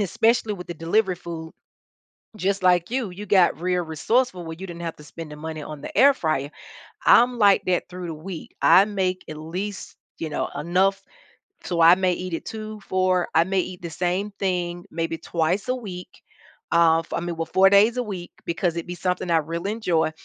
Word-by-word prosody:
especially 225 Hz, +1 st, +1 dB
with 180 Hz, -2 st, -9 dB
the 175 Hz, -, -6 dB
delivery 180 Hz, +4 st, +1 dB
food, 165 Hz, -2 st, -8 dB, 0.9 s
just 195 Hz, 0 st, -1 dB
like 180 Hz, 0 st, +3 dB
you, 245 Hz, -6 st, -2 dB
you 205 Hz, +4 st, -8 dB
got 180 Hz, -4 st, +3 dB
real 180 Hz, -1 st, 0 dB
resourceful 180 Hz, +5 st, 0 dB
where 160 Hz, 0 st, -7 dB
you 190 Hz, -, -7 dB
didn't 170 Hz, 0 st, -8 dB
have 165 Hz, -1 st, -4 dB
to 150 Hz, -, -14 dB
spend 155 Hz, +1 st, -9 dB
the -, -, -7 dB
money 155 Hz, 0 st, -6 dB
on 150 Hz, -1 st, -8 dB
the -, -, -8 dB
air 275 Hz, +5 st, +7 dB
fryer. 150 Hz, -, -1 dB, 0.6 s
I'm 245 Hz, +1 st, +5 dB
like 200 Hz, -3 st, +5 dB
that 180 Hz, -1 st, 0 dB
through 180 Hz, -1 st, -7 dB
the 165 Hz, -, -5 dB
week. 165 Hz, +2 st, -8 dB
I 195 Hz, -, +7 dB
make 190 Hz, -3 st, -2 dB
at 155 Hz, -, -6 dB
least, 185 Hz, +6 st, -6 dB, 0.2 s
you 160 Hz, -2 st, -4 dB
know, -, -, -2 dB
enough 190 Hz, +6 st, +1 dB, 0.6 s
so 170 Hz, -2 st, 0 dB
I 170 Hz, +2 st, +8 dB
may 185 Hz, -1 st, +1 dB
eat 180 Hz, 0 st, -5 dB
it -, -, -4 dB
2, 215 Hz, -1 st, -7 dB
4 185 Hz, -1 st, +1 dB
I 165 Hz, -, +6 dB
may 190 Hz, +1 st, 0 dB
eat 180 Hz, -1 st, -4 dB
the 170 Hz, -, -5 dB
same 180 Hz, +5 st, -1 dB
thing 175 Hz, -2 st, -2 dB
maybe 165 Hz, 0 st, -2 dB
twice 175 Hz, +8 st, -1 dB
a 255 Hz, -, +1 dB
week, 190 Hz, -7 st, -7 dB, 0.6 s
uh, 165 Hz, -1 st, +5 dB
for, -, -, -5 dB
I -, -, -2 dB
mean, 175 Hz, -1 st, -4 dB
well, 165 Hz, 0 st, -3 dB
4 195 Hz, +1 st, +5 dB
days 210 Hz, +5 st, +5 dB
a 250 Hz, -, 0 dB
week 190 Hz, -6 st, -7 dB
because 170 Hz, 0 st, -1 dB
it'd 170 Hz, -, -4 dB
be 175 Hz, -, -5 dB
something 180 Hz, +1 st, -2 dB
I 165 Hz, -, +5 dB
really 170 Hz, +5 st, -2 dB
enjoy 175 Hz, -8 st, 0 dB
180 Hz, 205 wpm, -24 LUFS, 165-195 Hz, 0.9 s, I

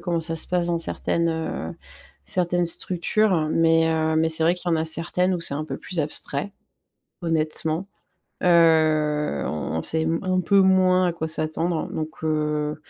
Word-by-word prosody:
comment 170 Hz, -1 st, -2 dB
ça 165 Hz, 0 st, -1 dB
se 160 Hz, -, +5 dB
passe 180 Hz, -1 st, 0 dB
dans 170 Hz, -1 st, -1 dB
certaines, 170 Hz, 0 st, -1 dB
heu, 160 Hz, -, -4 dB, 0.5 s
certaines 175 Hz, -1 st, 0 dB
structures, 175 Hz, 0 st, +1 dB
mais 165 Hz, 0 st, +3 dB
heu, 160 Hz, -1 st, 0 dB
mais 160 Hz, 0 st, +2 dB
c'est 160 Hz, 0 st, +1 dB
vrai 170 Hz, +2 st, +3 dB
qu'il 180 Hz, 0 st, -5 dB
y -, -, +4 dB
en -, -, +1 dB
a 160 Hz, -, -1 dB
certaines 175 Hz, +3 st, +1 dB
où 175 Hz, -, -4 dB
c'est 165 Hz, -, 0 dB
un 150 Hz, +2 st, -3 dB
peu -, -, -6 dB
plus 180 Hz, -3 st, -4 dB
abstrait, 145 Hz, +4 st, -3 dB, 0.7 s
honnêtement. 160 Hz, +2 st, -2 dB, 0.6 s
Heu, 155 Hz, -, +3 dB
on 75 Hz, -2 st, -4 dB
on -, -, -3 dB
sait 160 Hz, 0 st, 0 dB, 0.2 s
un 185 Hz, -1 st, 0 dB
peu 195 Hz, +3 st, +3 dB
moins 185 Hz, -1 st, +3 dB
à 175 Hz, -, 0 dB
quoi 165 Hz, -1 st, -4 dB
s'attendre 160 Hz, +1 st, -1 dB
donc 155 Hz, 0 st, -6 dB
heu 150 Hz, -1 st, -1 dB
165 Hz, 175 wpm, -23 LUFS, 155-175 Hz, 0.7 s, se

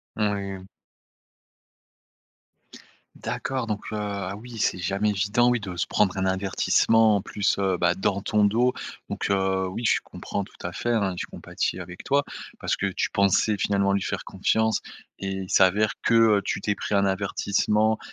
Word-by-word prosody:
Oui. 100 Hz, -3 st, -2 dB, 2.5 s
D'accord 130 Hz, -3 st, -3 dB
donc, 105 Hz, -1 st, -2 dB
heu, -, -, -3 dB
ah 100 Hz, -2 st, -3 dB
oui 120 Hz, +1 st, -10 dB
c'est 95 Hz, -, 0 dB
jamais 100 Hz, +4 st, 0 dB
évident 105 Hz, +5 st, +2 dB
oui 120 Hz, -, +1 dB
de 95 Hz, -4 st, -6 dB
se -, -, 0 dB
prendre 95 Hz, -2 st, +1 dB
un 95 Hz, -, 0 dB
avertissement 100 Hz, +3 st, +3 dB
en -, -, -3 dB
plus, 100 Hz, -1 st, -1 dB
heu, 95 Hz, -2 st, +1 dB
bah, 85 Hz, 0 st, +2 dB
dans 95 Hz, +1 st, -1 dB
ton 105 Hz, -1 st, +2 dB
dos. 120 Hz, +5 st, +3 dB, 0.3 s
Donc, -, -, -3 dB
heu, 95 Hz, -1 st, +1 dB
oui 115 Hz, +6 st, -5 dB
je -, -, +4 dB
comprends 100 Hz, -, -5 dB
tout -, -, -16 dB
à 90 Hz, -, -3 dB
fait, 120 Hz, -, -3 dB
hein, 100 Hz, -5 st, +1 dB
je -, -, -4 dB
compatis 95 Hz, -, -3 dB
avec 90 Hz, 0 st, -9 dB
toi. 140 Hz, 0 st, +2 dB, 0.4 s
Parce -, -, 0 dB
que -, -, -1 dB
tu -, -, -2 dB
pensais 100 Hz, +2 st, +3 dB
finalement 100 Hz, -1 st, +2 dB
lui 100 Hz, -, +1 dB
faire -, -, -3 dB
confiance 110 Hz, +3 st, +1 dB, 0.4 s
et 95 Hz, -, -4 dB, 0.2 s
il 95 Hz, -, -10 dB
s'avère 100 Hz, +3 st, +4 dB
que, -, -, +1 dB, 0.3 s
heu, -, -, -5 dB
tu 100 Hz, -, -2 dB
t'es 105 Hz, +1 st, 0 dB
pris 100 Hz, -, -3 dB
un 100 Hz, 0 st, +3 dB
avertissement 105 Hz, +2 st, +1 dB
100 Hz, 175 wpm, -25 LUFS, 95-110 Hz, 2.5 s, je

